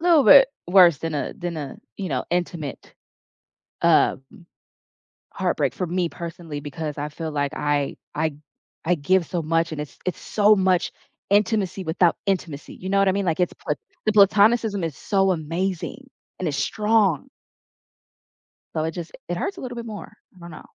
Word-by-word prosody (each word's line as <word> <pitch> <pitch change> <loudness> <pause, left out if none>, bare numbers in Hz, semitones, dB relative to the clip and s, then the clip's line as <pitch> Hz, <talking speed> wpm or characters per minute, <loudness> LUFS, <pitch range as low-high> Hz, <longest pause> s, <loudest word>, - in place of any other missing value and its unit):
little 330 -4 +5
bit 270 -2 +9 0.2
worse 175 -4 +6
than 165 +1 -4
a 145 - -2
than 175 -2 -4
a, 140 -3 -6 0.2
you 195 -2 -4
know, 130 -4 -2
intimate, 170 -5 -3 0.9
um, - - +4 1.1
heartbreak - - 0
for 180 -5 -3
me 175 0 0
personally 170 -3 -7
because 150 +1 -5
I 150 - -3
feel 160 +1 -5
like 145 -1 -1
I 145 -1 0 0.2
I 155 +1 0
g 145 - -15 0.5
I 175 - +3
give 175 +4 +2
so 170 +1 -2
much 165 +1 0
and 150 -1 -4
it's 150 - -9
it's 185 - -2
so 210 0 +4
much 185 -2 +2 0.4
intimacy 205 -2 +1
without 170 0 +2
intimacy, 165 -7 -2
you 185 - -7
know 195 0 +3
what 195 - +4
I 190 - +5
mean? 200 0 -1
Like 170 0 0
it's 180 - +1
pla - - -3 0.3
the 215 - +3
platonicism 205 0 +4
is 160 -4 -3
so 195 -2 +2
amazing 170 +2 -3 0.3
and - - -2
it's - - -2
strong, 210 -7 +1 1.5
So 155 - 0
it 160 - -2
just 170 -1 -7 0.2
it 175 - -2
hurts 390 - -3
a - - -8
little 245 -2 -6
bit 235 0 -6
more. 210 -2 -8 0.2
I - - -19
don't 170 0 -10
know. 155 - -11
175 Hz, 180 wpm, -23 LUFS, 160-195 Hz, 1.5 s, bit